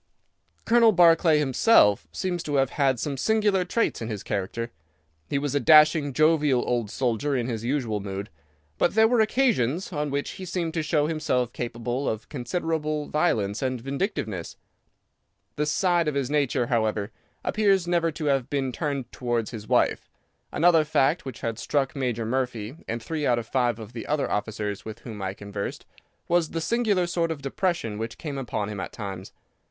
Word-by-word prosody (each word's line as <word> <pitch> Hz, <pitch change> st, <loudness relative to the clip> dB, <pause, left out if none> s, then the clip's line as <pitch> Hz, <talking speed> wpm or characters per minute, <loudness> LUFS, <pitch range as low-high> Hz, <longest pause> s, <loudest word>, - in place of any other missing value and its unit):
"Colonel 230 Hz, -1 st, +5 dB
Barclay 165 Hz, -3 st, +5 dB
himself 130 Hz, -, +4 dB
seems 175 Hz, -, -2 dB
to 145 Hz, -2 st, -3 dB
have 135 Hz, -1 st, +2 dB
had 135 Hz, -4 st, +1 dB
some 140 Hz, +3 st, -3 dB
singular 210 Hz, +1 st, +2 dB
traits 205 Hz, -, -1 dB
in 115 Hz, -, -3 dB
his 105 Hz, -3 st, -5 dB
character. 110 Hz, +4 st, -3 dB, 0.6 s
He -, -, 0 dB
was 140 Hz, -1 st, -2 dB
a 145 Hz, -, +2 dB
dashing, 155 Hz, +1 st, +6 dB
jovial 150 Hz, -3 st, +3 dB
old 120 Hz, -4 st, 0 dB
soldier 130 Hz, +4 st, -1 dB
in 120 Hz, -2 st, 0 dB
his 115 Hz, -3 st, -3 dB
usual 120 Hz, -4 st, -1 dB
mood, 100 Hz, 0 st, -6 dB, 0.5 s
but 175 Hz, -, +2 dB
there 220 Hz, 0 st, +6 dB
were 235 Hz, -1 st, +3 dB
occasions 195 Hz, -, +1 dB
on 150 Hz, -1 st, -1 dB
which 140 Hz, +1 st, -2 dB
he 185 Hz, -, -8 dB
seemed 175 Hz, -2 st, -2 dB
to 165 Hz, -, 0 dB
show 150 Hz, -1 st, +1 dB
himself 150 Hz, -6 st, -1 dB
capable 120 Hz, +2 st, -3 dB
of 110 Hz, 0 st, -5 dB
considerable 155 Hz, +2 st, -2 dB
violence 110 Hz, -, 0 dB
and 130 Hz, -2 st, -1 dB
vindictiveness. 130 Hz, -, -3 dB, 1.0 s
This 150 Hz, 0 st, 0 dB
side 175 Hz, 0 st, +2 dB
of 150 Hz, -, -1 dB
his 140 Hz, -1 st, -1 dB
nature, 140 Hz, -4 st, +1 dB
however, 110 Hz, -3 st, 0 dB, 0.3 s
appears 195 Hz, -4 st, +2 dB
never 170 Hz, -1 st, +1 dB
to 155 Hz, 0 st, -5 dB
have 135 Hz, -3 st, +1 dB
been 135 Hz, -2 st, -1 dB
turned 140 Hz, -3 st, -3 dB
towards 120 Hz, -3 st, -2 dB
his 110 Hz, -3 st, -8 dB
wife. -, -, +1 dB, 0.4 s
Another 165 Hz, 0 st, +4 dB
fact, 150 Hz, +1 st, +1 dB
which 130 Hz, -3 st, -7 dB
had 115 Hz, -1 st, -3 dB
struck 135 Hz, +2 st, -1 dB
Major 120 Hz, -4 st, -1 dB
Murphy 125 Hz, -1 st, -2 dB
and 115 Hz, 0 st, -4 dB
three 155 Hz, 0 st, -2 dB
out 120 Hz, -, +3 dB
of 120 Hz, -, -3 dB
five 120 Hz, -1 st, 0 dB
of 110 Hz, 0 st, -10 dB
the 115 Hz, -, -7 dB
other 150 Hz, -1 st, 0 dB
officers 105 Hz, -1 st, -3 dB
with 110 Hz, +1 st, -8 dB
whom 110 Hz, -4 st, -8 dB
I 95 Hz, 0 st, -3 dB
conversed, 100 Hz, 0 st, -6 dB, 0.4 s
was 170 Hz, -2 st, +2 dB
the 165 Hz, -, -3 dB
singular 210 Hz, -1 st, +1 dB
sort 170 Hz, -1 st, 0 dB
of 150 Hz, -4 st, -5 dB
depression 140 Hz, -, -1 dB
which 115 Hz, +1 st, -5 dB
came 145 Hz, -4 st, -5 dB
upon 110 Hz, -5 st, -3 dB
him 105 Hz, -2 st, -5 dB
at -, -, -5 dB
times. 95 Hz, -3 st, -6 dB
135 Hz, 180 wpm, -26 LUFS, 115-165 Hz, 1.0 s, dashing